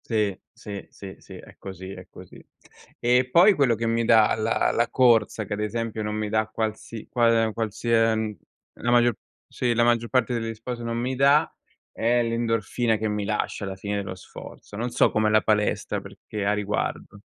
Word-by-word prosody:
Sì, 105 -4 0 0.2
sì, 100 -2 -9
sì, 95 -1 -10
sì, - - -14
è - - -14
così, 95 0 -8
è - - -10
così. - - -14 0.6
E 125 +1 +2
poi, 185 +7 +7
quello 135 -8 +2
che 115 +2 -3
mi 115 0 +1
dà 110 -2 +5
la 110 +1 +1
la 115 0 +1
corsa, 115 -4 +3
che 105 - -5
ad 105 - -4
esempio, 110 +1 -3
non 105 0 -3
mi 110 0 -2
dà 110 0 +1
qualsi 110 0 -5
qual 115 -2 +2
qualsia 115 +1 +1
ehm, 110 -1 -2 0.4
la 120 - -2
maggio 120 0 +4 0.3
sì, 120 -2 -1
la 120 - +3
maggior 120 -1 +2
parte 125 -2 +1
degli 115 0 -4
sport 120 +2 -6
non 115 0 -3
mi 125 +2 -2
dà, 140 +4 +3 0.4
è 120 +1 +1
l'endorfina 115 0 0
che 110 +1 -2
mi 105 -1 -2
lascia 105 0 -2
alla 95 -1 -5
fine 100 +1 -4
dello 95 -2 -4
sforzo. 95 +3 -12
Non 120 +4 -2
so - - +3
com'è 110 0 +2
la 110 0 +4
palestra 105 -1 0
perché 105 -2 -7
a 105 - +2
riguardo. 105 0 -3
115 Hz, 190 wpm, -25 LUFS, 105-120 Hz, 0.6 s, poi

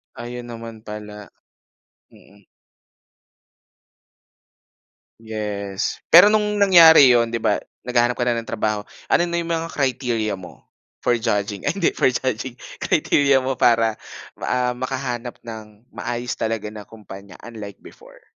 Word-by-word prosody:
Ayun 120 0 -7
naman 115 -2 -9
pala. 105 -2 -9 0.8
Mm. 100 0 -21 2.8
Yes. 105 -2 -4
Pero 190 +6 +8
no'ng 210 -1 +1
nangyari 170 -7 +8
'yon, 115 -1 +2
'di 115 - -2
ba - - 0 0.2
naghahanap 120 0 +1
ka 120 - 0
na 120 - +2
ng 115 - -13
trabaho, 110 -2 -1 0.3
ano - - +4
na 170 - -1
yung 170 0 -3
mga 165 0 -2
criteria 120 -6 -1
mo, 90 - -13 0.4
for - - +2
judging, 105 -3 -1
ay 145 - +1
hindi - - +2
for - - +2
judging, 130 -1 -3 0.3
criteria 140 -1 +2
mo 130 +1 -1
para 115 -2 +3 0.4
ah, 125 0 0
makahanap 125 -1 -4
ng 110 0 -11
maayos 120 -1 -4
talaga 110 -2 -3
na 105 -1 -9
kumpanya 100 -3 -12
unlike 105 -4 -9
before? - - -16
115 Hz, 130 wpm, -21 LUFS, 105-130 Hz, 2.8 s, Pero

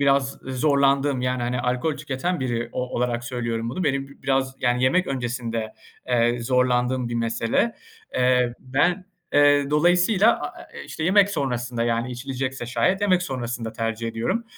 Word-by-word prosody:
biraz 140 -1 +3
zorlandığım, 140 0 +2
yani, 125 -1 -1
hani, 120 0 -1
alkol 125 +5 -1
tüketen 145 +4 -2
biri 120 -2 -2
o - - -2
olarak 120 -1 -1
söylüyorum 115 -2 -3
bunu, 175 +8 -3
benim 135 -1 0
bi 140 - -18
biraz, 135 -1 0
yani, 120 +1 +1
yemek 175 +9 +3
öncesinde, 120 -4 -3 0.4
eee, 120 -1 +2
zorlandığım 125 0 +1
bir 120 - -4
mesele. 115 - 0 0.4
Eee, 125 -1 +2
ben, 170 +9 +1 0.3
eee, 145 -1 +4
dolayısıyla, 180 +8 +4
a - - -4 0.2
e - - -7
e - - -8
işte, 155 - -5
yemek 200 +2 +5
sonrasında, 125 -6 -2
yani, 120 +1 0
içilecekse 130 0 -4
şayet, 185 +10 +1
yemek 185 -3 +3
sonrasında 120 -6 -4
tercih 115 0 -3
ediyorum. 115 - -2
130 Hz, 155 wpm, -24 LUFS, 120-145 Hz, 0.4 s, yemek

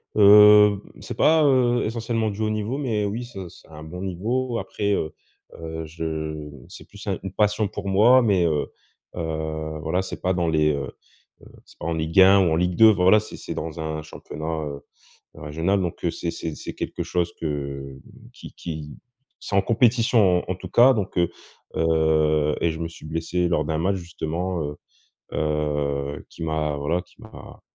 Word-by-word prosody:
Heu, 105 0 +8 0.2
c'est - - -6
pas, 160 0 +4
heu, 125 -3 +3
essentiellement 115 0 -1
du 105 +1 -6
haut 110 - +1
niveau, 110 +5 -2
mais 110 -7 -1
oui, 115 +5 -3
c'est 95 -7 -8
c'est - - -17
un 75 -1 -11
bon 90 +3 -8
niveau. 115 +7 -2
Après 100 -1 -2
heu 80 -5 -1 0.5
heu, 80 0 -6
je 80 -1 -5 0.2
c'est - - -12
plus - - -12
un - - -1
une 95 -1 -6
passion 105 0 +1
pour 100 - -7
moi, 115 +7 +6
mais 100 -6 +2
heu 75 -3 0 0.5
heu, 80 -2 -4
voilà, 90 +4 -1
c'est - - -7
pas 95 0 +1
dans 85 -1 0
les 75 -1 +2
heu 70 -3 -4 0.5
heu, - - -16 0.2
c'est - - -20
pas - - -6
en 85 - -1
Ligue 80 +3 +2
1 95 +1 +7
ou 90 - +3
en - - +2
Ligue 90 +1 0
2, 110 0 +8
voilà, 95 +1 +5
c'est 110 - -9
c'est - - -7
dans 80 0 -5
un 80 -1 -4
championnat, 80 0 -6
heu, 70 -1 -7 0.5
régional, 80 +7 -1
donc 85 -1 -5
heu, 85 - +2
c'est 85 - -3
c'est 80 -2 -5
c'est - - -8
quelque - - -4
chose 85 -1 -1
que, 80 - -2 0.5
hem, 65 - -14 0.3
qui - - -12
qui 80 -3 -7 0.4
c'est 100 - -3
en 100 - +4
compétition 115 -5 +3
en 95 - -1
tout 95 +1 -9
cas, 125 +6 +6
donc 100 -5 -3
heu 85 0 +2 0.4
heu 80 -2 +2
et 85 - +2
je 80 - -5
me 85 - -3
suis 80 -1 -12
blessé 85 +2 -1
lors 75 -3 +1
d'un 80 +1 -2
match 95 +4 +1
justement, 85 0 -4
heu 75 0 -5 0.6
heu, 75 -2 -2
qui 85 - -11
m'a 80 -2 -1
voilà, 75 +5 -1
qui 90 - -18
m'a 110 - -12
85 Hz, 190 wpm, -23 LUFS, 80-105 Hz, 0.6 s, Heu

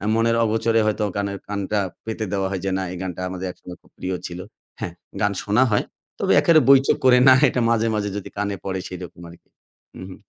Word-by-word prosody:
মনের 115 0 +2
অগোচরে 115 +1 +1
হয়তো 110 0 0
গানের 100 -1 -2
কানটা 100 0 -2 0.3
পেতে 110 -1 -3
দেওয়া 95 -1 0
হয় 95 -2 -3
যে, 95 - 0
না 95 - -2
এই 90 - -6
গানটা 90 -1 -5
আমাদের 95 0 -5
একসময় 90 0 -12
খুব - - -26
প্রিয় 90 0 -3
ছিল। 90 0 -8 0.4
হ্যাঁ, 90 -6 -5 0.3
গান 105 0 +2
শোনা 105 +6 +3
হয়। 105 - +2 0.4
তবে - - +2
এক্কারে 165 -2 +5
বৈচককরে 130 -2 +5
না - - +9
এটা 125 - 0
মাঝে, 115 -1 +2
মাঝে, 105 -1 -1
যদি 100 - -7
কানে 100 -1 -1
পড়ে 95 -1 -2
সেরকম 90 -1 -9
আরকি। 85 - -17 0.5
উ, - - -8
হুম। 95 - -11
100 Hz, 205 wpm, -22 LUFS, 95-115 Hz, 0.5 s, না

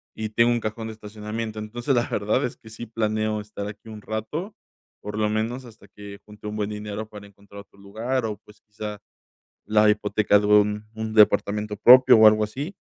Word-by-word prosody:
y 110 -1 -4
tengo 115 +2 +3
un 120 - +1
cajón 110 +1 -5
de 110 - -7
estacionamiento. 110 +1 -6
Entonces, 120 +5 -3
la 120 - +1
verdad 105 +6 0
es 125 - -6
que 110 - -16
sí 120 +2 -8
planeo 110 -1 -1
estar 105 -1 -7
aquí 105 +2 -10
un 105 -1 -9
rato, 150 - -5 0.5
por 105 0 -6
lo 105 -1 +1
menos 115 +4 -2
hasta 110 -3 -16
que 100 0 -11
junte 105 0 -11
un 105 - -5
buen 105 -1 -2
dinero 105 +1 -6
para 105 -1 -11
encontrar 100 0 -14
otro 100 - -23
lugar 115 +6 -3
o, 105 -2 -4
pues, 105 - -19
quizá 105 -1 -8 0.7
la 105 0 +4
hipoteca 105 0 +2
de 105 - -2
un 105 0 +3
un 110 0 -5
departamento 105 0 +3
propio 125 +2 +8
o 110 0 +8
algo 110 0 +4
así. 140 - -5
105 Hz, 200 wpm, -24 LUFS, 105-110 Hz, 0.7 s, propio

